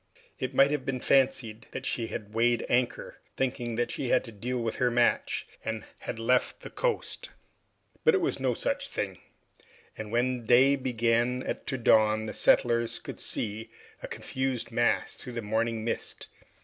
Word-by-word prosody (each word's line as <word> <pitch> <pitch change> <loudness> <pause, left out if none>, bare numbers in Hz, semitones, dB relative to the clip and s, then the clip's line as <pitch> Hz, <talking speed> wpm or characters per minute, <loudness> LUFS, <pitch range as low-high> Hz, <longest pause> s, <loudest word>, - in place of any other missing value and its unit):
It 130 +1 -3
might 135 +2 +6
have 150 -3 -1
been 130 -1 -2
fancied 125 -5 +2
that - - -5
she 115 -2 -1
had 105 -1 -6
weighed 120 +1 +2
anchor, 120 0 0 0.2
thinking 120 -3 -1
that 120 +1 0
she 130 - -3
had 130 - +4
to 115 - -9
deal 120 +4 -3
with 115 -1 -2
her 125 - +3
match, 120 0 +1 0.2
and 110 -1 -3
had - - -5
left 125 +2 +1
the - - -8
coast. - - -2 0.7
But 470 -2 +6
it - - +3
was 345 - -1
no - - +1
such - - -2
thing, - - -4 0.8
and 105 -1 -7
when 125 +1 +1
day 125 +5 +6
began 120 -1 +1 0.2
to 130 - -1
dawn 110 -2 +4
the 110 - -5
settlers 115 -1 +3
could - - -8
see 110 +1 -2 0.3
a - - -5
confused 130 -3 -3
mass 120 +1 +1
through 125 - -9
the 115 -1 -4
morning 110 +1 -1
mist. 115 - -4
120 Hz, 170 wpm, -29 LUFS, 115-130 Hz, 0.8 s, might